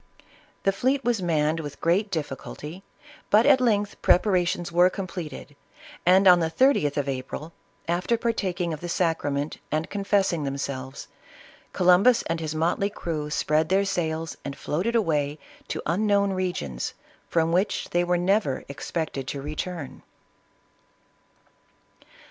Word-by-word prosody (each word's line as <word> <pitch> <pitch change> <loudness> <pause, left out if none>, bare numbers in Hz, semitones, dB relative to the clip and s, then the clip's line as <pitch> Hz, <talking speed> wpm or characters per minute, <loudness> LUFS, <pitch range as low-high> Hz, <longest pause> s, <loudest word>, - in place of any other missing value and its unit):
The 195 - +3
fleet 260 +7 0
was 235 -4 +1
manned 160 -2 +1
with 145 -3 -7
great 190 +5 +1
difficulty, 155 +1 -5 0.5
but 215 +3 +5
at 275 -2 +6
length 210 -4 +1
preparations 175 -2 +2
were 175 +2 +5
completed, 170 -7 -7 0.5
and, 190 +2 +6
on 180 -1 +8
the 165 -1 0
30th 165 - +2
of 140 -1 0
April, 135 +4 -5 0.3
after 180 +7 +1
partaking 190 -7 -1
of 155 - -7
the 175 - -5
sacrament 155 -4 -1
'and 155 +2 -1
confess 200 -1 +1
ing 160 -3 -2
themselves, 135 -1 -4 0.6
Columbus 185 +7 +5
and 165 0 -2
his 155 -1 -4
motley 170 +5 +1
crew, 160 -7 -4
spread 155 +1 +1
their 195 +2 +3
sails 165 -4 -2
and 140 0 -6
floated 185 +13 -1
away 150 -9 +1 0.3
to - - -4
unknown 200 +3 +2
regions, 175 - -3 0.3
from 165 -1 +2
which 185 +4 0
they 175 0 +2
were 175 0 +1
never 180 -6 +1
expected 140 -1 -4
to 140 - -4
return. 155 0 -5
175 Hz, 135 wpm, -25 LUFS, 150-195 Hz, 0.6 s, on